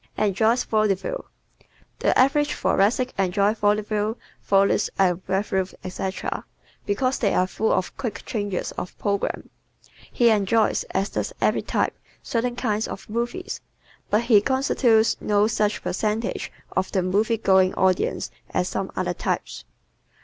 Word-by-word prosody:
Enjoys 220 Hz, +4 st, +2 dB
Vaudeville 215 Hz, -, 0 dB, 0.3 s
¶ -, -, -29 dB, 0.3 s
The -, -, +2 dB
average 290 Hz, +3 st, +3 dB
Thoracic 245 Hz, +6 st, +1 dB
enjoys 200 Hz, +3 st, +2 dB
vaudeville, 210 Hz, +1 st, +1 dB, 0.2 s
Follies, 195 Hz, 0 st, +3 dB
revues, 190 Hz, +1 st, 0 dB
etc., 190 Hz, +1 st, -4 dB, 0.4 s
because 255 Hz, +6 st, 0 dB
they 205 Hz, -4 st, +1 dB
are 185 Hz, -, +3 dB
full 215 Hz, +4 st, -1 dB
of 185 Hz, -, 0 dB
quick 235 Hz, -5 st, -5 dB
changes 205 Hz, -6 st, -2 dB
of 180 Hz, -, -7 dB
program. 200 Hz, -1 st, -2 dB, 0.6 s
He 235 Hz, -2 st, +4 dB
enjoys, 215 Hz, +1 st, +2 dB
as 195 Hz, +1 st, -1 dB
does -, -, -3 dB
every -, -, +2 dB
type, -, -, -1 dB, 0.3 s
certain 240 Hz, +1 st, -1 dB
kinds 220 Hz, -3 st, -1 dB
of -, -, -8 dB
movies, 240 Hz, +11 st, -3 dB, 0.5 s
but 215 Hz, +3 st, +2 dB
he 225 Hz, -4 st, +5 dB
constitutes 240 Hz, -3 st, +2 dB
no 205 Hz, 0 st, +3 dB
such 215 Hz, -2 st, 0 dB
percentage 215 Hz, +4 st, -2 dB, 0.2 s
of 190 Hz, -, -1 dB
the 190 Hz, -, +1 dB
movie 210 Hz, +5 st, +1 dB
going 190 Hz, -3 st, +3 dB
audience 190 Hz, -1 st, +1 dB, 0.2 s
as -, -, 0 dB
some -, -, -3 dB
other -, -, -1 dB
types. -, -, -3 dB
210 Hz, 135 wpm, -24 LUFS, 195-230 Hz, 0.6 s, he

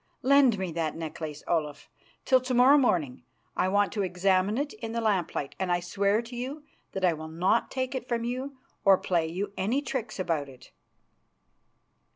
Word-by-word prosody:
Lend 270 Hz, -4 st, +5 dB
me 190 Hz, -2 st, -3 dB
that 160 Hz, -2 st, -2 dB
necklace, 155 Hz, -2 st, -6 dB
Olaf, 150 Hz, -4 st, -2 dB, 0.4 s
till 260 Hz, -1 st, +4 dB
to 255 Hz, 0 st, -2 dB
morrow 255 Hz, +4 st, +7 dB
morning. 160 Hz, -, +1 dB, 0.3 s
I -, -, +1 dB
want 205 Hz, +1 st, +2 dB
to 210 Hz, -, -1 dB
examine 185 Hz, +3 st, +1 dB
it 285 Hz, +1 st, -2 dB
in 225 Hz, -2 st, -6 dB
the 230 Hz, -, -1 dB
lamplight, 190 Hz, -10 st, -1 dB
and 190 Hz, -2 st, -1 dB
I 175 Hz, -, +2 dB
swear 200 Hz, +5 st, 0 dB
to 240 Hz, +1 st, -10 dB
you 265 Hz, +5 st, -5 dB, 0.3 s
that 190 Hz, -1 st, 0 dB
I 175 Hz, -, +4 dB
will 160 Hz, 0 st, -7 dB
not 180 Hz, +8 st, +1 dB
take 260 Hz, 0 st, -3 dB
it 255 Hz, -2 st, -4 dB
from 235 Hz, -1 st, 0 dB
you 260 Hz, +3 st, -4 dB, 0.3 s
or 195 Hz, -2 st, +6 dB
play 170 Hz, -4 st, 0 dB
you 195 Hz, +5 st, -4 dB
any 220 Hz, +9 st, +1 dB
tricks 235 Hz, -6 st, -4 dB
about 165 Hz, -6 st, -1 dB
it." 130 Hz, -2 st, -15 dB
200 Hz, 185 wpm, -28 LUFS, 170-245 Hz, 0.4 s, morrow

